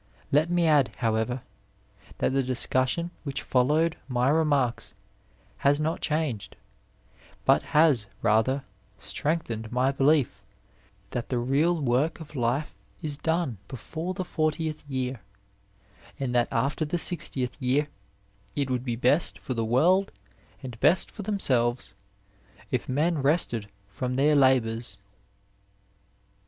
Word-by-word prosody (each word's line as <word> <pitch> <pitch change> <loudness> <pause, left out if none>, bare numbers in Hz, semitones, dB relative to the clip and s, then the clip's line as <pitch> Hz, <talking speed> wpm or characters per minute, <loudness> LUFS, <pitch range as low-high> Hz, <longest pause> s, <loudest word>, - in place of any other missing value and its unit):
Let 150 +4 +3
me 175 -1 +2
add, 145 -8 +3
however, 115 +2 -1 0.8
that - - 0
the 135 - +2
discussion 130 +6 0
which 140 -2 -3
followed 150 +6 +2
my 125 0 +1
remarks 145 -8 +1 0.6
has 145 +1 +3
not 160 +2 -1
changed, 150 -9 -2 0.9
but - - +5 0.2
has 145 -10 +4 0.2
rather 115 +5 +2 0.3
strengthened 120 -9 -3
my 130 +2 +2
belief 135 -7 +2 0.7
that 120 -1 -4
the 125 - 0
real 145 +8 +1
work 135 +4 +1
of 155 -2 -11
life 130 +4 -2
is 150 -2 -1
done 160 - -1
before 160 +8 -5
the 185 - -3
fortieth 155 -2 -2
year 130 -2 -2 1.0
and 130 -3 -2
that 120 -1 +3
after 140 +7 0
the 155 +3 -1
sixtieth 145 -8 +2
year 130 +4 +2 0.7
it 140 -2 -1
would 125 -1 -1
be 120 -3 -2
best 130 +7 +3
for 130 - -5
the 115 -2 -1
world 165 - +3 0.5
and 125 -3 -8
best 180 - +4
for 215 - -8
themselves 130 - 0 0.8
if - - -2
men 155 +5 +1
rested 135 -7 +1 0.2
from 125 +6 -4
their 145 +3 +3
labours. 125 -4 +2
135 Hz, 125 wpm, -27 LUFS, 125-155 Hz, 1.0 s, but